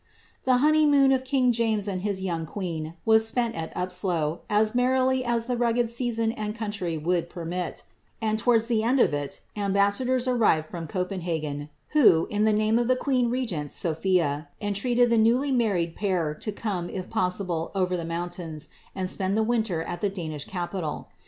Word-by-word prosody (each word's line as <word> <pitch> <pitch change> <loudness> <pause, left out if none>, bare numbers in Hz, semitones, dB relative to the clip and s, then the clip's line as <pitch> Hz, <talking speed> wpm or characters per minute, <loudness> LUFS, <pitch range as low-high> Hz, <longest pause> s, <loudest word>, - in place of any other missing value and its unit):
The 255 -1 +4
honeymoon 290 -1 +4
of 260 -1 +2
king 260 -1 +2
James 220 -3 +1
and 185 -2 -2
his 195 -1 -2
young 165 -3 -2
queen 165 -4 -5
was 220 0 +5
spent 235 0 0
at 160 -1 -5
Upslo, 180 -3 -1
as 215 +1 +2
merrily 255 +1 +2
as 235 -2 0
the 250 0 -1
rugged 235 -1 +1
season 235 -2 0
and 215 -1 -4
country 205 -7 -3
would 170 +2 -1
permit; 175 +1 -4 0.4
and 220 -1 0
towards 230 0 +3
the 230 -2 +1
end 245 +4 +2
of 235 - +4
it, 145 -1 -4
ambassadors 205 +6 +1
arrived 220 -11 +3
from 165 -1 -6
Copenhagen, 165 -5 -3 0.2
who, 225 - +5
in 210 0 +1
the 220 - +4
name 215 +2 +2
of 240 - 0
the 255 - +3
queen 255 -2 +1
regent, 210 - -2
Sophia, 160 -3 0
entreated 235 +4 +1
the 230 - +4
newly 245 +6 +3
married 195 -10 +1
pair 180 -7 0
to 210 +7 -5
come, 195 -5 -3
if 185 -1 -5
possible, 180 -3 -1
over 185 -1 +1
the 170 - -3
mountains, 165 -2 -5 0.3
and 185 -1 -2
spend 190 +2 0
the 220 - +3
winter 220 -8 0
at 175 +1 -6
the 205 - +1
Danish 160 -6 -5
capital. 175 -3 -4
205 Hz, 175 wpm, -26 LUFS, 175-235 Hz, 0.4 s, was